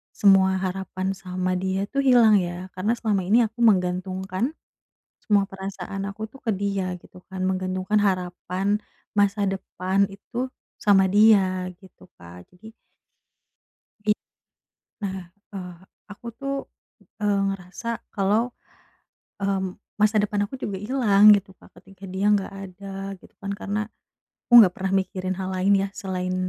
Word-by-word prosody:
semua 190 -1 +5
harapan 190 0 -3
sama 185 -1 -2
dia 190 +2 -2
tuh 275 0 -1
hilang 230 -5 +6
ya 180 0 -3
karena 210 +5 +1
selama 210 -5 -1
ini 225 +6 +5
aku 235 +1 0
menggantungkan, 185 - +1 0.7
semua 205 -2 +3
perasaan 195 0 -6
aku 205 +2 -6
tuh 270 - -14
ke 225 - 0
dia, 195 -2 -1
gitu 180 - -16
kan. 185 0 -3
Menggantungkan 185 +2 0
harapan, 185 +2 -1 0.3
masa 205 0 +2
depan, 195 0 0
itu 240 +6 -5 0.3
sama 195 -2 +5
dia 195 -4 +4
gitu, 190 -1 -18
Kak, 85 +1 -13
jadi 205 +5 -14 1.3
It 210 0 +3 0.8
nah, 190 -3 -5 0.2
eee, 180 -2 -7 0.4
aku 220 +4 -10
tuh, 275 +2 -3 0.7
eee, 205 -1 +2
ngerasa 195 +3 -6 0.3
kalau, 215 +5 +1 0.9
eee, 195 0 +1 0.4
masa 215 +1 +4
depan 205 0 -1
aku 265 - -11
juga 200 -2 -3
hilang 210 -2 +5
gitu, 195 -1 -2
Kak, - - -18
ketika 195 0 -16
dia 190 +2 -2
nggak 195 -1 -1
ada, 195 0 -7
gitu - - -19
kan, 200 - -4
karena 205 +1 -3 0.7
aku - - -14
nggak 180 -4 +5
pernah 190 0 -2
mikirin 185 0 -4
hal 185 - -3
lain 190 +2 +3
ya 195 0 0
selain, 185 -3 -3
195 Hz, 140 wpm, -24 LUFS, 185-205 Hz, 1.3 s, hilang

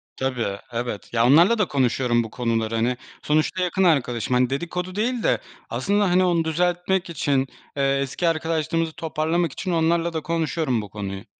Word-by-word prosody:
Tabii, 120 -7 -2
evet. 120 -2 -4
Ya, 115 0 +3
onlarla 170 - +6
da 210 -5 +2
konuşuyorum 125 -3 +1
bu 110 - -7
konuları. 115 -2 -1
Hani, 120 +2 +1 0.2
sonuçta 155 +4 +1
yakın 185 +2 +1
arkadaşım. 125 - +1
Hani, 125 0 +3
dedikodu 180 +6 -3
değil 235 +2 -1
de - - +2 0.3
aslında, 205 -1 +1
hani, 185 +1 +4
onu 170 -2 +2
düzeltmek 180 +3 0
için, 140 -4 0 0.3
eee, 135 0 +2
eski 140 +6 -1
arkadaşlığımızı 165 0 0
toparlamak 160 0 -1
için 185 -2 -4
onlarla 165 +1 +1
da 160 - -2
konuşuyorum 160 -6 -1
bu 105 - -9
konuyu. 100 0 -6
155 Hz, 165 wpm, -23 LUFS, 125-175 Hz, 0.3 s, onlarla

